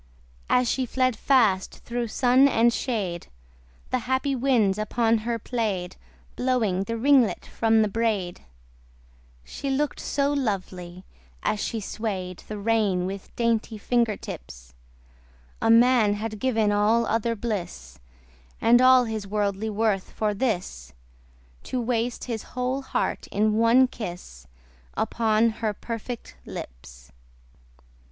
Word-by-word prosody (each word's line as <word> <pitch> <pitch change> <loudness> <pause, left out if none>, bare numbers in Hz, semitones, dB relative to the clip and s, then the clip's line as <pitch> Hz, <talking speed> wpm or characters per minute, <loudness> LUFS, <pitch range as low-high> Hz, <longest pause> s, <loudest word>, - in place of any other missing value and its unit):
As 250 0 +3
she 255 +1 0
fled 255 0 +1
fast 215 -7 +2
thro' 240 0 -2
sun 255 +4 +4
and 235 -3 +3
shade, 200 -11 -3 0.6
The 255 - +1
happy 265 +1 +1
winds 235 -6 +2
upon 225 +1 +1
her 230 +2 -2
play'd, 205 -6 -3 0.4
Blowing 225 -7 0
the 230 +3 -3
ringlet 260 -2 +3
from 225 -1 +2
the - - +1
braid: 205 -5 -1 1.0
She 275 - -6
look'd 280 +2 -1
so 285 0 0
lovely, 185 -8 -3 0.4
as 210 - 0
she 225 - -2
sway'd 190 -4 -4
The 215 - -5
rein 205 -4 +1
with 195 +1 -6
dainty 230 -1 0
finger 230 0 +1
tips, - - -10 0.9
A - - +2
man 230 -2 +5
had 215 0 -5
given 225 -4 +1
all 215 +3 +3
other 230 +1 0
bliss, 180 - -5 0.6
And 240 +2 +5
all 255 0 +7
his 220 -3 -4
worldly 205 +1 -1
worth 210 -2 0
for 215 -1 0
this, 180 - -3 0.7
To 255 - -2
waste 235 0 -1
his 230 -3 -4 0.2
whole 255 +2 -1
heart 265 - -2
in 215 +1 +1
one 230 +4 +5
kiss 175 - -8 0.5
Upon 225 0 +2
her 215 -2 -1
perfect 230 +2 -7
lips. - - -10
225 Hz, 125 wpm, -25 LUFS, 200-245 Hz, 1.0 s, all